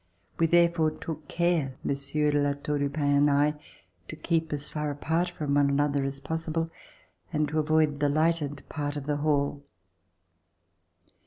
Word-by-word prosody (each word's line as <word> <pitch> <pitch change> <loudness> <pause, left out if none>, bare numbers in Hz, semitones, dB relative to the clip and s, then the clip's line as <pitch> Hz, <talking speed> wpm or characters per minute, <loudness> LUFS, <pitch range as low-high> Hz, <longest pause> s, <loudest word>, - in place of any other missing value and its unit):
We 165 - +4
therefore 170 -1 +4
took 155 -1 -7
care, 170 -6 0
Monsieur 150 +2 0
de 145 0 +2
La 145 0 +2
Tour 145 +1 -3
du 140 0 0
Pin 145 +1 -2
and 145 +1 +4
I, 145 +1 +3 0.5
to - - -7
keep 160 0 -1
as 145 0 -1
far 150 -1 -2
apart 160 +5 -1
from 150 -5 -3
one 145 0 +4
another 140 0 +1
as 135 0 -4
possible 160 +2 -2 0.6
and 155 -2 +1
to 155 - 0
avoid 155 -1 +2
the 145 -1 +2
lighted 155 -2 0
part 145 -1 -3
of 140 - -5
the 150 0 0
hall. 145 -1 0
150 Hz, 165 wpm, -28 LUFS, 145-160 Hz, 0.6 s, We